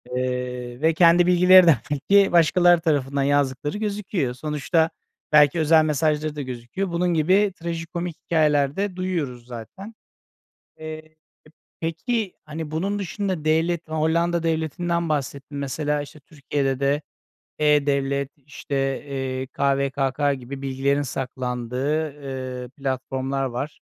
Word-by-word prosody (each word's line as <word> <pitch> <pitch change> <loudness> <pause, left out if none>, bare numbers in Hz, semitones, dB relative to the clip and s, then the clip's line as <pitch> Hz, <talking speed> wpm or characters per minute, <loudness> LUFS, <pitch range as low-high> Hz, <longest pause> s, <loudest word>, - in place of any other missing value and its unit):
eee, 125 0 -3
ve 160 +1 +3
kendi 170 +1 +5
bilgileri 180 0 +7
de 155 -6 +6
belki 195 +8 +3
başkaları 175 0 +5
tarafından 140 -4 0
yazdıkları 145 +3 0
gözüküyor. 200 - -2
Sonuçta 150 +4 0 0.4
belki 150 +2 +5
özel 155 0 +5
mesajları 150 0 0
da 145 - -4
gözüküyor. 130 +9 -4
Bunun 175 +1 +1
gibi 185 +5 +3
trajikomik 170 0 -4
hikâyeler 150 -3 +2
de 200 -2 -2
duyuyoruz 155 -10 -3
zaten. 185 - -9 0.8
Eee, 155 0 -9 0.6
peki 190 +5 -2
hani 155 0 -6
bunun 195 +6 -1
dışında 190 -4 -3
devlet 165 +2 +1
Hollanda 165 +2 +1
devletinden 165 +1 -1
bahsettin. 140 -1 -3
Mesela 145 +1 -1
işte 145 +1 -12
Türkiye'de 140 -2 -3
de 140 +2 +1 0.6
e-Devlet 140 -2 +2
işte, 135 -1 -3
eee, 130 -1 -3
KVKK 140 +1 0
gibi 135 +1 -8
bilgilerin 140 +1 0
saklandığı, 130 +3 -2 0.5
eee, 125 - -8
platformlar 135 0 -3
var. 130 +4 -4
150 Hz, 115 wpm, -23 LUFS, 135-170 Hz, 0.8 s, bilgileri